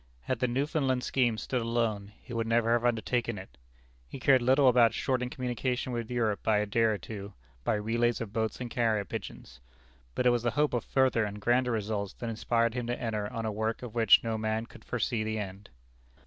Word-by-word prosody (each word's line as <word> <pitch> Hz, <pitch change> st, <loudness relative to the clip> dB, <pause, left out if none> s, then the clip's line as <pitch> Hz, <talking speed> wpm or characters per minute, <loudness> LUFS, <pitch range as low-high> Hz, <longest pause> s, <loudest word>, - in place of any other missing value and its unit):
Had 130 Hz, -, -2 dB
the 125 Hz, -, +2 dB
Newfoundland 135 Hz, 0 st, 0 dB
scheme 120 Hz, -4 st, +1 dB
stood 125 Hz, +2 st, -2 dB
alone, 115 Hz, -3 st, -1 dB
he 125 Hz, -, -9 dB
would 115 Hz, -1 st, -1 dB
never 115 Hz, 0 st, +2 dB
have 120 Hz, 0 st, +2 dB
undertaken 120 Hz, -1 st, 0 dB
it. 95 Hz, +1 st, -10 dB, 0.5 s
He 130 Hz, -, -8 dB
cared 130 Hz, 0 st, +5 dB
little 130 Hz, +3 st, +4 dB
about 120 Hz, -2 st, +5 dB
shortening 125 Hz, -2 st, -1 dB
communication 125 Hz, 0 st, -2 dB
with 115 Hz, -2 st, -3 dB
Europe 115 Hz, -4 st, 0 dB
by 110 Hz, -1 st, +2 dB
a 105 Hz, -, +1 dB
day 105 Hz, +3 st, 0 dB
or 110 Hz, -2 st, +3 dB
two, 100 Hz, +1 st, -8 dB, 0.3 s
by -, -, +1 dB
relays 115 Hz, +3 st, 0 dB
of 110 Hz, -3 st, -6 dB
boats 110 Hz, -1 st, -1 dB
and 125 Hz, -, -4 dB
carrier 110 Hz, -4 st, +1 dB
pigeons. 65 Hz, -6 st, -8 dB, 0.6 s
But -, -, 0 dB
it 125 Hz, -, +6 dB
was 120 Hz, -1 st, +1 dB
the 120 Hz, -, +1 dB
hope 150 Hz, -2 st, +2 dB
of 120 Hz, -, 0 dB
further 130 Hz, -4 st, +2 dB
and 105 Hz, 0 st, -4 dB
grander 125 Hz, +3 st, +2 dB
results 105 Hz, -3 st, -2 dB
that 115 Hz, -1 st, -5 dB
inspired 115 Hz, +1 st, +1 dB
him 120 Hz, -1 st, -3 dB
to 120 Hz, -, -2 dB
enter 105 Hz, -3 st, -2 dB
on 115 Hz, -2 st, -4 dB
a 110 Hz, -, -1 dB
work 110 Hz, +3 st, -2 dB
of 120 Hz, -3 st, -7 dB
which 115 Hz, -3 st, +6 dB
no 110 Hz, -1 st, -2 dB
man 110 Hz, +1 st, -1 dB
could -, -, -15 dB
foresee 120 Hz, -2 st, -1 dB
the 110 Hz, 0 st, -2 dB
end. 100 Hz, -1 st, -6 dB
115 Hz, 215 wpm, -29 LUFS, 110-125 Hz, 0.6 s, it